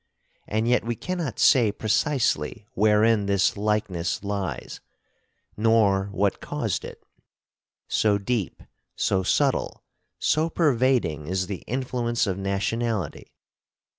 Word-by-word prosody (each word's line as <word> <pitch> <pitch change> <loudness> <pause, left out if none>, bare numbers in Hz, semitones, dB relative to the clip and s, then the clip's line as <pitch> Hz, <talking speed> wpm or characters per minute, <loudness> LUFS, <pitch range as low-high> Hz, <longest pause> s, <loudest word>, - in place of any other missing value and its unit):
And 110 +2 0
yet 125 +1 +3
we 120 +1 -2
cannot 170 - -4
say 120 -6 +5
precisely 110 - 0
wherein 105 -1 +3
this 100 -1 +2
likeness 105 -4 -1
lies, 100 -3 -4 0.8
nor 105 -3 +3
what 100 0 -1
caused - - -2
it; - - -10 0.8
so 105 -2 +2
deep, 100 -2 -3 0.3
so 95 - +1
subtle, 95 - 0 0.3
so 160 +2 +1
pervading 125 - +1
is 95 +1 -1
the 95 -1 -6
influence 120 -2 -1
of 95 -2 -2
nationality. 100 0 -2
105 Hz, 105 wpm, -25 LUFS, 100-120 Hz, 0.8 s, say